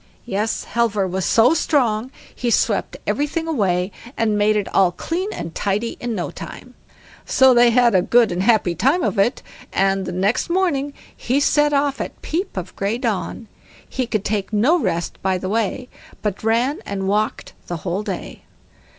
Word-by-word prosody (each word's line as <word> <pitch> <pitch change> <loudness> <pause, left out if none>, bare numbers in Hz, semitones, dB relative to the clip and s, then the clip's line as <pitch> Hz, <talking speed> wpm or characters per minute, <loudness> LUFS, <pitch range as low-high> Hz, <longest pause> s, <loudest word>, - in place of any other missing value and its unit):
Yes, 215 0 -1
Halvor 225 -4 0
was 185 0 -2
so 235 +6 +5
strong 250 -8 +1 0.2
he 245 - -2
swept - - +1
everything 300 +3 -1
away, 190 - 0 0.3
and 220 -2 +1
made 210 +1 +3
it 205 -2 0
all 190 -2 +4
clean 350 - -3
and 170 - -6
tidy 210 +3 -1
in 240 -2 -3
no 175 - -3
time. - - -10 0.5
So 265 -1 +5
they 240 0 +6
had 240 -1 +4
a 185 - +5
good 235 +3 +3
and 175 +1 -1
happy 205 -4 +3
time 275 - +2
of 200 - 0
it, 235 +6 +1 0.3
and 195 -1 +1
next 200 - +1
morning 320 -6 0 0.2
he 260 +4 0
set 295 +1 +3
off 280 -1 +1
at - - -6
peep 340 - -3
of 185 0 -5
grey 200 +4 -1
dawn; 230 -1 -3 0.4
he 255 -2 -3
could 215 -3 -2
take 205 -1 -1
no 250 +12 +3
rest 175 - -2
by 190 -1 +1
the 185 +1 -4
way, 225 +3 -1 0.4
but 210 -2 -2
ran 240 - +1
and 195 -1 -4
walked 210 +2 -1
the 175 - -3
whole 185 +3 -1
day. 200 -4 -6
220 Hz, 175 wpm, -21 LUFS, 195-260 Hz, 0.5 s, they